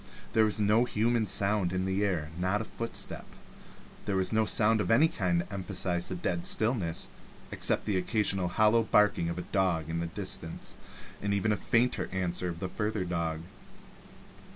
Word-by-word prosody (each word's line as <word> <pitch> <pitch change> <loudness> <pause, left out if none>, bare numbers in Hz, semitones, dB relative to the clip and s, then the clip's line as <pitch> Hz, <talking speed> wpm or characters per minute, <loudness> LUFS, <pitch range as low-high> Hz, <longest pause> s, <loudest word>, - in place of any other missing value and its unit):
There 110 -1 +4
was 110 0 +1
no 105 +3 +3
human 115 -1 0
sound 100 -3 +2
in 95 0 -1
the 95 +2 0
air, 85 -6 -1
not 95 +2 0
even 105 - 0
a - - -15
footstep. 115 0 -3 0.8
There 100 - -1
was 95 +3 +1
no 110 0 +2
sound 110 0 +3
of 90 - -3
any 140 +8 +5
kind 90 - 0
to 90 - -10
emphasize 90 -2 -1
the 95 - -3
dead 85 -1 -2
stillness, 110 -8 +1 0.4
except - - +1
the 100 -3 0
occasional 95 -1 0
hollow 110 +5 +3
barking 105 -6 +2
of 85 - -4
a 90 - -4
dog 85 -5 0
in 85 - -2
the 85 - -2
distance 85 -3 -5 0.5
and 100 0 -1
the 105 +1 +1
fainter 120 +4 0
answer 90 -1 -1
of 85 +1 -6
a - - -1
further 105 0 -2
dog. 85 -2 -2
95 Hz, 175 wpm, -29 LUFS, 90-110 Hz, 0.8 s, any